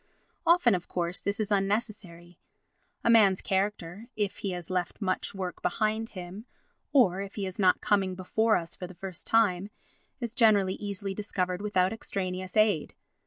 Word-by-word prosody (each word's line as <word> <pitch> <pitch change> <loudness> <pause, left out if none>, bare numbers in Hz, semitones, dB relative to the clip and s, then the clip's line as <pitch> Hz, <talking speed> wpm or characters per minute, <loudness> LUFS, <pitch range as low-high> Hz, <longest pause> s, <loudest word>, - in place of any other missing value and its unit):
Often, 335 - +5
of 180 -2 -2
course, 175 0 -2
this 200 +1 -1
is 215 -1 -1
unnecessary; 195 -4 -2 0.6
a - - +2
man's 200 -5 +6
character, 195 +1 -2
if 205 -2 -1
he 200 - -2
has 180 -1 -5
left 180 -1 -2
much 195 -1 -2
work 185 -3 -5
behind 220 +1 0
him, 185 +6 -8 0.4
or 195 -9 +4
if 200 0 -7
he 200 - -2
is 185 +1 -7
not 185 -2 +4
coming 195 -3 +1
before 220 +4 +2
us 165 -1 -6
for 180 - -7
the 185 - -12
first 185 -1 -8
time, 205 -4 +3 0.5
is 235 -3 -4
generally 210 -5 +4
easily 200 -1 -4
discovered 185 -2 -2
without 195 -2 +1
extraneous 185 -3 -4
aid. 210 -8 +2
195 Hz, 165 wpm, -28 LUFS, 180-215 Hz, 0.6 s, man's